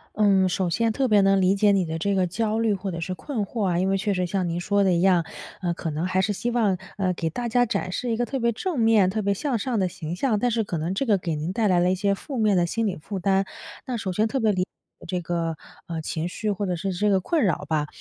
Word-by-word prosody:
嗯， 195 -3 +4
首 180 0 0
先 225 +7 +1
特 265 +4 0
别 210 -3 +5
能 195 0 +4
理 190 +1 +3
解 205 0 +4
你 195 -2 +2
的 160 0 -3
这 200 +5 0
个 185 -1 +2
焦 220 +4 -1
虑 225 -2 +2
或 195 0 -3
者 170 - -5
是 185 +3 -3
困 220 +2 -3
惑 220 +2 -3
啊， 175 -1 +1
因 185 - +1
为 195 - +2
确 205 +1 0
实 180 -1 0
像 180 0 -1
您 170 +1 -2
说 200 +3 +1
的 190 - +3
一 170 - +2
样， 180 -2 +4 0.4
呃， 175 -1 0
可 170 -1 -4
能 155 +3 -2
还 185 0 +1
是 205 +2 0
希 240 +5 -2
望， 215 -6 +2 0.2
呃， 185 -2 +1
给 165 -1 -2
大 240 +9 -4
家 245 +1 +3
展 225 -4 -2
示 245 -2 -2
一 225 - 0
个 240 - +1
特 270 - -3
别 235 -1 +1
正 320 - -3
面、 225 -5 +4
特 215 +2 -1
别 200 0 +1
向 260 +4 -1
上 230 +1 -1
的 185 - +2
形 160 -1 -6
象， 215 +4 +1
但 245 +3 +1
是 225 -2 0
可 170 - -3
能 165 +4 -2
这 270 +8 -1
个 210 -4 +3
给 170 -3 -3
您 155 +5 -3
带 215 -1 +1
来 180 -1 +4
了 175 +1 +3
一 - - 0
些 200 +1 +1
负 260 +6 -6
面 210 -3 +3
的 175 - +3
心 225 +6 -1
理 195 -4 -1
负 195 +5 -6
担。 195 +1 +2 0.4
那 255 - -3
首 200 -5 -3
先 215 +5 +1
特 265 - -2
别 220 -1 +3
理 185 -2 0
解 - - -7 0.4
这 180 - -1
个， 165 -1 -2 0.3
呃， 165 -2 -4
情 160 +2 -3
绪 210 +3 -2
或 200 0 -2
者 180 - 0
是 190 +3 -3
这 205 +4 +1
个 195 - +4
困 300 - 0
扰 185 - 0
吧。 150 -2 0
195 Hz, 320 characters per minute, -25 LUFS, 180-220 Hz, 0.4 s, 别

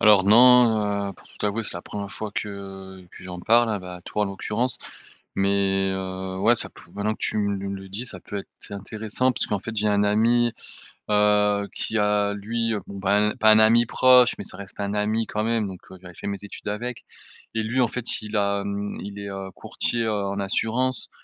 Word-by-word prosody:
Alors 105 -3 +6
non, 110 -3 +5
heu, - - -8
pour - - -20
tout - - -20
t'avouer, 105 +2 -1
c'est - - -5
la 85 - -6
1re 100 -1 -6
fois 105 +1 -5
que 95 -2 -7
que - - -14
j'en 90 -1 -7
parle, 115 -1 +3
ben, 90 - -9
à 90 - -14
toi, 105 +3 -2
en - - +1
l'occurrence. 105 +5 -2 0.6
Mais, 95 -1 +1
heu, 95 0 -4
ouais 115 +5 +4
ça - - +3
p - - -16
maintenant 105 +1 -1
que - - -15
tu - - 0
me 100 -1 -2
le 95 0 -10
dis, 105 +6 -4
ça - - -4
peut 105 - -6
être 100 - -7
c'est - - -9
intéressant 110 +5 -1
puisqu'en 105 -4 -1
fait 115 +3 -7
j'ai 105 0 +1
un 100 0 +2
ami, 115 +3 +3 0.6
heu, 105 -1 +3
qui 110 - -1
a 105 0 +2
lui 115 +3 -2
bon 100 0 -8
ben, 105 +2 +2
pas 110 -2 +6
un 110 - +7
ami 115 +2 +6
proche, 125 +1 +5
mais - - -6
ça - - -6
reste 100 -1 -11
un 100 0 -2
ami 110 +2 0
quand 105 0 -2
même, 115 -2 0
donc 95 -2 -8 0.2
j'avais 90 -1 -12
fait - - -9
mes 100 0 -3
études 105 0 -8
avec. 115 +3 -4 0.5
Et 110 - 0
lui 120 +4 0
en 120 - +3
fait 120 -2 -1
il 105 0 -4
a 100 0 +1
hem 100 0 -4
il 100 0 -7
est, 100 0 -6
heu, 95 0 -6
courtier, 115 -1 -2
heu, 110 - 0
en 100 -1 -2
assurance. 115 +6 0
105 Hz, 220 wpm, -24 LUFS, 100-110 Hz, 0.6 s, un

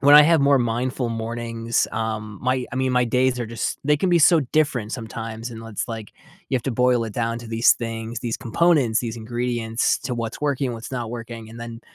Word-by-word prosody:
when 145 +1 +7
I 150 - +12
have 165 0 +4
more 140 -1 +5
mindful 120 +1 -1
mornings, 115 0 -2
um, 110 -2 -3
my 130 0 0
I - - -3
mean, 130 -1 +1
my 125 0 +3
days 125 +1 +2
are 115 - -2
just 115 +1 -3
they 150 +1 +4
can 180 +4 0
be 170 - +5
so 165 +1 +6
different 130 -8 +1
sometimes, 115 -1 -5
and 115 -1 -8
l 115 - -9
it's 105 - -4
like 110 -3 -6 0.4
you 130 - +3
have 120 - -3
to 135 - 0
boil 125 0 +3
it 110 - -7
down 115 0 -1
to 120 - -10
these 115 +1 +5
things, 115 0 -5
these 115 -2 -2
components, 130 -3 +2
these 115 -1 -4
ingredients, 120 0 0
to 130 -2 -3
what's 115 +1 -4
working, 140 -3 0
what's 115 +3 -8
not 120 -3 -3
working, 115 -2 -7
and 115 - -10
then 115 0 -7
120 Hz, 225 wpm, -23 LUFS, 115-130 Hz, 0.4 s, I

